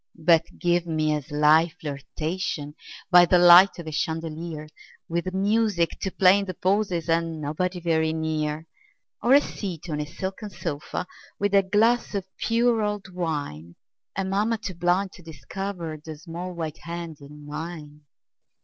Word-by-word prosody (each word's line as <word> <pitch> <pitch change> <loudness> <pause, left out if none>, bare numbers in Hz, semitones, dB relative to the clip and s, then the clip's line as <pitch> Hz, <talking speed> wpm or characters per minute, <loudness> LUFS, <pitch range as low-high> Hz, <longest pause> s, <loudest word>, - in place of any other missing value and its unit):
But 165 0 +4
give 175 -1 +1
me 155 -1 +1
a 150 - -1
sly 150 +4 +3
flirtation 150 +1 -4 0.4
By 175 0 +9
the 180 +1 +4
light 175 +2 +8
of 170 - -7
a 155 - -5
chandelier 160 0 -3 0.4
With 170 +2 -2
music 200 -2 +1
to 190 - -1
play 190 +1 +5
in 200 - -3
the 185 -2 -6
pauses, 185 -3 0
And 165 -1 0
nobody 175 +5 -2
very 160 -2 +1
near; 160 -1 -2 0.6
Or 250 +3 +5
a - - +9
seat 175 - -6
on 150 - -2
a 150 - -4
silken 190 +6 -5
sofa, 170 -3 -4 0.3
With 205 0 0
a 200 - +7
glass 215 +4 +2
of 195 -2 -2
pure 230 0 +2
old 210 -3 -3
wine, 145 - -4 0.4
And 190 0 -2
mamma 215 +4 +1
too 205 -3 -6
blind 180 +3 +1
to 185 - -14
discover 170 0 -6
The 155 -1 -8
small 175 +3 -7
white 160 -2 -5
hand 170 -2 -6
in 145 +1 -12
mine. 150 0 -7
170 Hz, 160 wpm, -25 LUFS, 155-190 Hz, 0.6 s, By